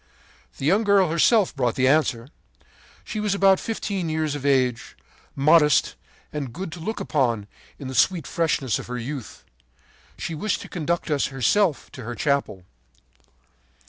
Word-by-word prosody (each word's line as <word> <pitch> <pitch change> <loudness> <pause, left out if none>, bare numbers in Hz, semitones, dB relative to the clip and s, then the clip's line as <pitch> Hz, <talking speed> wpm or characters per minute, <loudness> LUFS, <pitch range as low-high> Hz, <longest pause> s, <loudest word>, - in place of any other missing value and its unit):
The - - -5
young 195 +8 +3
girl 200 -5 +3
herself 195 +4 +3
brought 125 -4 0
the 130 0 +2
answer. 130 -4 +1 0.7
She 215 - -5
was 210 -2 0
about 195 -1 +4
fifteen 200 -6 -3
years 155 -1 -1
of 145 -1 -3
age, 130 -4 0 0.4
modest 150 +1 +4 0.4
and 140 -5 -4
good 185 +5 -6
to 175 - -8
look 220 +7 -4
upon 120 -8 0 0.3
in 135 - -8
the 130 - -6
sweet 170 +4 +2
freshness 145 -8 0
of - - -8
her 125 0 -4
youth. 130 0 -7 0.7
She 165 - -4
wished 205 +7 -2
to - - -10
conduct 170 -1 -2
us 145 -2 +1
herself 145 - +1
to 130 - -10
her 120 +2 -5
chapel. 140 -11 -1
150 Hz, 155 wpm, -24 LUFS, 130-185 Hz, 0.7 s, about